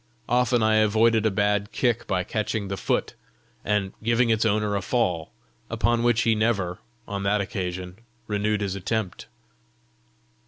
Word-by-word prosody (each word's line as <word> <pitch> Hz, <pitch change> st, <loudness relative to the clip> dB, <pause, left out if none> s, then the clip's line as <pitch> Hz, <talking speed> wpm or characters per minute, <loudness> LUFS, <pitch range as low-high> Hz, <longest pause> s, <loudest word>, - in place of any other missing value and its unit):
Often 120 Hz, -1 st, +2 dB
I 110 Hz, 0 st, +4 dB
avoided 110 Hz, +1 st, +3 dB
a -, -, +3 dB
bad 105 Hz, 0 st, 0 dB
kick 120 Hz, -3 st, 0 dB
by 90 Hz, -1 st, 0 dB
catching 105 Hz, 0 st, -2 dB
the 100 Hz, -, -2 dB
foot -, -, -1 dB, 0.5 s
and 100 Hz, -2 st, 0 dB
giving 115 Hz, +1 st, +2 dB
its 110 Hz, 0 st, +2 dB
owner 105 Hz, -1 st, +1 dB
a 100 Hz, -, 0 dB
fall, 90 Hz, -, -1 dB, 0.4 s
upon 120 Hz, 0 st, +1 dB
which 120 Hz, -1 st, +3 dB
he 115 Hz, -, +3 dB
never, 105 Hz, -5 st, 0 dB, 0.3 s
on 100 Hz, -1 st, -4 dB
that 100 Hz, +2 st, +1 dB
occasion, 90 Hz, -2 st, -4 dB, 0.3 s
renewed 105 Hz, 0 st, 0 dB
his 100 Hz, -2 st, -1 dB
attempt. 100 Hz, 0 st, -3 dB
105 Hz, 150 wpm, -25 LUFS, 100-115 Hz, 0.5 s, I